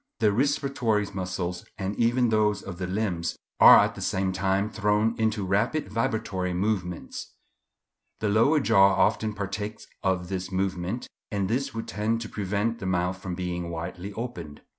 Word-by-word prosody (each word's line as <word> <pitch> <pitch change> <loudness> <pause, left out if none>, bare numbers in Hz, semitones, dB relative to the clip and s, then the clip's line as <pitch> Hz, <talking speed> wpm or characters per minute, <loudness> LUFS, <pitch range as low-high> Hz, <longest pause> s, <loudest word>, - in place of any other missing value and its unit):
The 110 -2 +3
respiratory 125 -3 +1
muscles, 90 -1 -3
and 95 0 -3
even 120 +2 +2
those 105 -2 +2
of 95 -2 -7
the 90 - -2
limbs, 90 -4 -2 0.2
are - - +10
at - - +3
the - - -9
same 95 0 0
time 95 +2 +1
thrown 105 +1 +1
into 110 -2 +1
rapid 105 +9 0
vibratory 105 -6 -1
movements. 90 -3 -3 0.8
The 110 - 0
lower 115 +9 +4
jaw 100 -5 +5
often 110 -1 +1
partakes 105 +1 -4 0.2
of 90 -2 0
this 95 0 -4
movement, 95 +3 -2 0.2
and 100 -2 0
this 125 +3 -1
would 115 - -4
tend 105 +4 -1
to 110 - -6
prevent 105 +3 -1
the 95 - -4
mouth 90 0 0
from 90 -2 -4
being 90 -1 -3
widely 90 +4 -5
opened. 90 -11 -6
100 Hz, 160 wpm, -26 LUFS, 95-110 Hz, 0.8 s, are